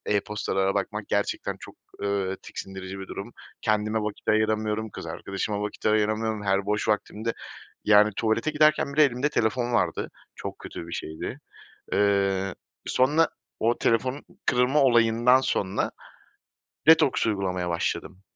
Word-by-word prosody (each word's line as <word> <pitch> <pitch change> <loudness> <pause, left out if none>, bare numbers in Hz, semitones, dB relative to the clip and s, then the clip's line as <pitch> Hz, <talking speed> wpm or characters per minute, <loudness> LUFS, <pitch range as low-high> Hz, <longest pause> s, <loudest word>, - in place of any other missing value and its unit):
e-postalara 100 -1 0
bakmak - - -3
gerçekten - - -1
çok, - - -11 0.3
ııı, 100 -1 -1
tiksindirici 95 0 -7
bir 95 - -8
durum. 100 +5 -7 0.3
Kendime 110 0 +1
vakit 105 -1 -5
ayıramıyorum, 110 0 +1
kız - - -8
arkadaşıma 100 +1 -3
vakit 105 +1 -4
ayıramıyorum. 110 0 +1
Her 100 0 +1
boş 105 +1 0
vaktimde, 110 +1 -1 0.5
yani, 105 0 +6
tuvalete 115 +6 +1
giderken 150 -2 +3
bile 155 0 +6
elimde 130 +2 +1
telefon 120 -1 0
vardı, 120 - 0 0.3
çok - - -6
kötü 85 - -8
bir 85 - -9
şeydi. 80 - -5 0.5
Iıı, 100 -2 +2 0.3
sonra 150 +6 +3 0.3
o 115 +2 +2
telefonun 130 +4 0 0.2
kırılma 125 +4 +3
olayından 120 0 +5
sonra 95 -7 -1 1.0
detoks 160 -7 +5
uygulamaya 95 -4 -1
başladım. 90 +2 -3
110 Hz, 125 wpm, -26 LUFS, 100-120 Hz, 1.0 s, yani